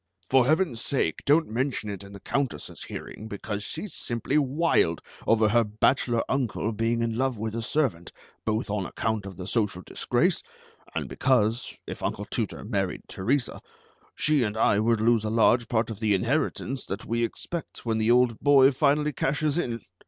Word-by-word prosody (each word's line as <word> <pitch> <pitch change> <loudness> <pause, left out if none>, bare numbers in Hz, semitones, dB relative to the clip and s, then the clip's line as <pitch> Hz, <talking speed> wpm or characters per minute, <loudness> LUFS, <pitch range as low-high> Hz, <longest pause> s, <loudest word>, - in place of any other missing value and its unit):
"For 130 -2 +5
Heaven's 155 -6 +2
sake, 105 - 0
don't 155 +3 +4
mention 125 0 -2
it 100 0 -7
in 100 - -12
the 100 - -10
Countess's 135 +5 -3
hearing, 110 - -8
because 105 0 -4
she's 165 - -6
simply 120 +4 -3
wild 145 - +2 0.3
over 110 -1 +4
her 120 +2 +4
bachelor 115 +2 +1
uncle 125 -4 -1
being 115 +2 0
in 115 0 -2
love 130 -3 0
with 110 +1 -3
a 115 - -2
servant, 115 - -1 0.3
both 110 +1 -1
on 100 -4 -1
account 110 -3 -2
of 95 - -9
the 90 - -6
social 105 -4 -1
disgrace, - - 0 0.5
and - - -2
because, 120 -3 +1
if - - -7
Uncle - - -2
Tooter - - -3
married - - -2
Teresa, 125 +7 -1 0.5
she 150 -2 +2
and 110 -2 -1
I 105 -2 +3
would 115 0 +2
lose 115 -1 +3
a 110 - -1
large 115 +1 +3
part 115 -1 0
of 105 - -7
the 110 -3 +2
inheritance 130 +3 -1
that 100 +3 -5
we 115 +1 0
expect 165 +8 -5
when 110 -1 0
the 110 +1 +1
old 120 -2 +4
boy 140 -1 +6
finally 150 +2 +2
cashes 145 +3 0
in. 115 -8 -2
115 Hz, 175 wpm, -27 LUFS, 110-135 Hz, 0.5 s, boy